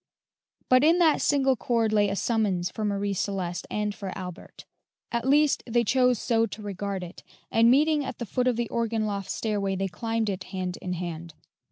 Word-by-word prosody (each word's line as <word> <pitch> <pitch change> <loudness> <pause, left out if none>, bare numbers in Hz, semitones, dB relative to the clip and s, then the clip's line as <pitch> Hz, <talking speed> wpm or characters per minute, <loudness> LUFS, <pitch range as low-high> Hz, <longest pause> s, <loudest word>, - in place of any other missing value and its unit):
But 255 +1 +5
in 325 +3 +5
that 330 -3 +4
single 270 -2 +3
chord 230 -2 0
lay 205 -1 +3
a 195 - -2
summons 195 -6 0
for 220 - -5
Marie 200 -1 -1
Celeste 185 -3 -3
and 210 -1 -1
for 195 -2 -6
Albert; 180 -2 -9 0.5
at 235 +1 -1
least, 295 +1 +4
they 235 0 +2
chose 250 +2 +3
so 230 +1 +1
to 215 +1 -9
regard 200 -1 -4
it, 175 - -10 0.3
and 230 +1 +5
meeting 295 +3 +4
at - - -6
the 235 - -4
foot 250 +3 -1
of 250 - +2
the 235 0 -1
organ 230 -2 -1
loft 200 -2 -3
stairway, 200 -3 -1
they 195 +1 -1
climbed 225 +2 -2
it 185 -1 -5
hand 185 -1 -4
in 180 - -3
hand. 170 -2 -6
215 Hz, 195 wpm, -26 LUFS, 195-240 Hz, 0.5 s, But